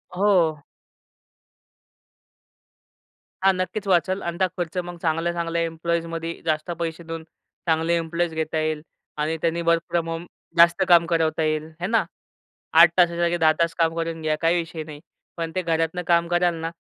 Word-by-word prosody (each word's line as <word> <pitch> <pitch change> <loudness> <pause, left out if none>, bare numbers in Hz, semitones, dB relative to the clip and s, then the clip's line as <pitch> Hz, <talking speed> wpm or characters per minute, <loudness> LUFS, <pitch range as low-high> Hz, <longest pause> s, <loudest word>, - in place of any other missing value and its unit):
हो. 175 -6 +2 2.8
हां, 195 0 +5
नक्कीच 200 +3 -3
वाचेल 185 +2 +2
अन् 170 - -6
ता 185 - +3
खर्च 175 +1 -4
मग 175 -1 -8
चांगल्या-चांगल्या 170 +1 -1
एम्प्लॉईजमध्ये 165 0 -3
जास्त 155 +2 -1
पैसे 165 0 -4
देऊन, 165 -1 -5 0.5
चांगले 165 +1 +2
इम्प्लॉईज 170 0 -2
घेता 160 0 -2
येईल. 155 -1 -1 0.4
आणि 155 +2 -1
त्यानी 170 0 0
वर्क 165 0 +3
फ्रॉम 165 -1 -1
होम 165 +1 -4 0.3
जास्त 170 +3 +6
काम 170 -1 +6
करवता 160 -1 +1
येईल, 155 0 -1
हे 180 - -1
ना? 225 0 +2 0.8
8 170 - +9
तासाच्या 175 -1 +3
ऐवजी 175 0 +1
10 155 - +7
तास 165 0 +1
काम 165 0 +2
करून 165 -1 -3
घ्या, 155 -1 0
काही 165 +1 +3
विषय 165 -2 -4
नाही. 150 -1 -10 0.4
पण 165 -1 -3
ते 185 - +1
घरातनं 165 +1 -1
काम 170 -1 +3
कराल 175 0 +3
ना 165 0 -4
165 Hz, 160 wpm, -23 LUFS, 160-175 Hz, 2.8 s, 8